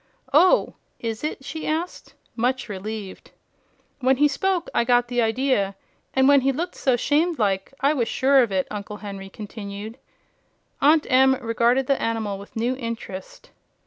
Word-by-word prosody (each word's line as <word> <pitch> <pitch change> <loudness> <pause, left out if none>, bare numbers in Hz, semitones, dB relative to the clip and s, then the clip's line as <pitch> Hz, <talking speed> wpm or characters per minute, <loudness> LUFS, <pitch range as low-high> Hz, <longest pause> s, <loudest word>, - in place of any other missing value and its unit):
"Oh, 365 - +5 0.3
is 225 +1 -4
it?" 300 -3 -4
she 310 +3 -5
cried, 320 +3 0 0.5
much 250 +2 0
relieved. 205 -1 -7 0.7
"When 260 0 +3
he 295 +2 +5
spoke, 355 +5 -1
I - - +3
got 245 0 +2
the 245 -1 +1
idea; 225 -4 +1 0.4
and 265 0 +4
when 280 -1 +6
he 270 +1 +2
looked 325 +7 -3
so 260 -2 +1
'shamed 310 +7 +1
like, 195 -2 0
I 280 +3 +3
was 240 -6 0
sure 270 +3 +4
of 235 -4 0
it," 190 -1 0
Uncle 210 0 -6
Henry 195 -1 -7
continued. 210 +2 -8 0.8
Aunt 300 +2 +5
Em 265 +1 +5
regarded 240 +2 +1
the 275 +1 0
animal 220 -3 -2
with 200 - -13
new 235 +3 0
interest. 230 -6 -7
245 Hz, 160 wpm, -23 LUFS, 215-275 Hz, 0.8 s, when